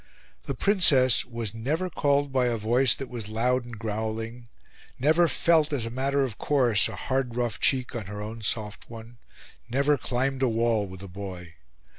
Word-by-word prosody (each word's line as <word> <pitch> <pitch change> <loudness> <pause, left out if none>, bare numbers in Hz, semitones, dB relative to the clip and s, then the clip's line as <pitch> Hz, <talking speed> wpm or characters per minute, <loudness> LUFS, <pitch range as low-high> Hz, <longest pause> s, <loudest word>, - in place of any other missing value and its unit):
The - - -3
Princess 145 - +5
was 115 -4 -4
never 145 +11 -2
called 145 -4 0
by 130 -2 +2
a 120 -1 -1
voice 120 +4 +4
that 135 - -7
was 115 -4 -6
loud 120 +3 0
and 120 -2 -9
growling; 110 +2 -5 0.5
never 160 +6 +3
felt, 160 -2 +2
as 135 -6 -1
a 115 - -5
matter 135 +3 0
of 120 -6 -5
course, 125 -7 +3
a - - -7
hard 130 -3 -2
rough 120 -3 -2
cheek 130 -2 +1
on 110 -5 -5
her 105 0 -7
own 110 +2 -7
soft 105 0 -3
one; 115 +1 -11 0.5
never 140 +3 +1
climbed 130 +3 -2
a 130 - +3
wall 115 -2 0
with 95 +1 -10
a - - -8
boy. 90 -2 -8
120 Hz, 180 wpm, -26 LUFS, 110-135 Hz, 0.5 s, Princess